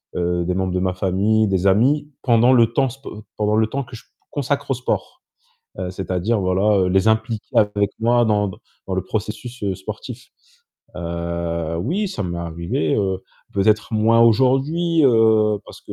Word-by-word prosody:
heu, 90 Hz, 0 st, 0 dB
des 90 Hz, +1 st, -1 dB
membres 95 Hz, -1 st, -1 dB
de 90 Hz, -, 0 dB
ma 95 Hz, 0 st, 0 dB
famille, 100 Hz, +4 st, +1 dB
des 95 Hz, -1 st, +1 dB
amis 135 Hz, +10 st, +2 dB
pendant 120 Hz, 0 st, +4 dB
le 115 Hz, -2 st, +4 dB
temps 135 Hz, 0 st, +2 dB
sp 135 Hz, +3 st, -14 dB, 0.3 s
pendant 105 Hz, 0 st, +1 dB
le 110 Hz, 0 st, +3 dB
temps 140 Hz, +5 st, -3 dB
que 125 Hz, 0 st, -12 dB
je 115 Hz, -, -12 dB, 0.3 s
consacre 140 Hz, 0 st, -2 dB
au -, -, +4 dB
sport. 125 Hz, +1 st, -3 dB, 0.6 s
Heu, 90 Hz, -, -3 dB
c'est-à-dire 95 Hz, +4 st, -1 dB
voilà 95 Hz, +1 st, +2 dB
les 95 Hz, +2 st, +2 dB
impliquer 110 Hz, 0 st, 0 dB
avec 105 Hz, -1 st, +2 dB
moi 120 Hz, +1 st, +3 dB
dans 105 Hz, -2 st, +1 dB
dans 95 Hz, -, -9 dB, 0.3 s
dans 95 Hz, -, -1 dB
le 95 Hz, -, -1 dB
processus, 110 Hz, +4 st, -5 dB
heu, 100 Hz, -2 st, -1 dB
sportif. 110 Hz, +5 st, -8 dB, 0.7 s
Heu, 85 Hz, -1 st, -3 dB
oui 180 Hz, -, -1 dB
ça 185 Hz, -, -4 dB
m'est 85 Hz, -1 st, -4 dB
arrivé, 85 Hz, -1 st, -2 dB
heu, 95 Hz, -2 st, 0 dB, 0.3 s
peut-être 105 Hz, +3 st, +1 dB
moins 110 Hz, +2 st, +3 dB
aujourd'hui, 135 Hz, +8 st, +3 dB
heu, 110 Hz, -4 st, +4 dB
parce -, -, -13 dB
que -, -, -9 dB
105 Hz, 175 wpm, -21 LUFS, 95-120 Hz, 0.7 s, pendant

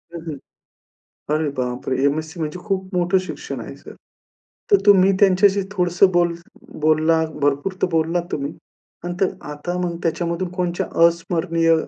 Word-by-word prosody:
हं, 170 Hz, -, -5 dB
हं 150 Hz, -3 st, -4 dB, 1.0 s
अरे 155 Hz, -1 st, 0 dB
बापरे! 125 Hz, +1 st, -2 dB
एम-एस-सी 155 Hz, +4 st, -1 dB
म्हणजे 155 Hz, +2 st, -3 dB
खूप 190 Hz, -2 st, -3 dB
मोठं 180 Hz, +2 st, +2 dB
शिक्षण -, -, -6 dB
आहे -, -, -8 dB
सर. -, -, -13 dB, 0.8 s
तर 405 Hz, -, +8 dB
तुम्ही 195 Hz, -1 st, +6 dB
त्यांच्याशी 200 Hz, 0 st, +4 dB
थोडसं 180 Hz, -1 st, +3 dB
बोल 175 Hz, -1 st, +3 dB, 0.5 s
बोललात 155 Hz, +1 st, +3 dB
भरपूर 145 Hz, +6 st, +1 dB
तर -, -, +5 dB
बोललात 165 Hz, +1 st, +1 dB
तुम्ही 140 Hz, +1 st, -2 dB, 0.5 s
आणि 175 Hz, -, -3 dB
तर 190 Hz, -, +2 dB, 0.2 s
आता 160 Hz, +5 st, -4 dB
मग 170 Hz, -1 st, -3 dB
त्याच्यामधून 170 Hz, +2 st, -1 dB
कोणच्या 180 Hz, -1 st, -2 dB, 0.2 s
अस्मरणीय 165 Hz, -1 st, +1 dB
170 Hz, 140 wpm, -21 LUFS, 155-185 Hz, 1.0 s, तर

